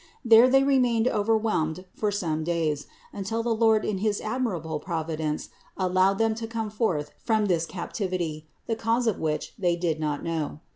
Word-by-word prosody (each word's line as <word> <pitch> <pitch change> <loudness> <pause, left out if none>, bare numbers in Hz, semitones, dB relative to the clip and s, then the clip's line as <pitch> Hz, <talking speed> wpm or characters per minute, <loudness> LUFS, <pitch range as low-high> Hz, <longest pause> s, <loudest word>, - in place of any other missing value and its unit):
There 230 +2 +8
they 270 +1 +5
remained 250 -4 +3
overwhelmed 210 -7 0
for 210 -1 -1
some 160 -6 -1
days, 160 -3 -1 0.3
until 205 +3 -2
the 235 -1 +1
Lord 220 -1 +3
in 200 -3 -1
his 210 0 0
admirable 195 -10 -2
providence 160 -3 -3 0.3
allowed 185 +1 +2
them 225 0 +2
to 225 - -3
come 225 -2 -3
forth 175 -10 -1
from 220 -2 +2
this 170 -4 +1
captivity, 175 -4 -4 0.2
the 225 - -1
cause 230 +2 0
of 225 -4 0
which 155 -1 -2
they 175 -3 +2
did 170 -3 -1
not 150 -2 -2
know. 160 -3 -3
195 Hz, 165 wpm, -26 LUFS, 160-225 Hz, 0.3 s, There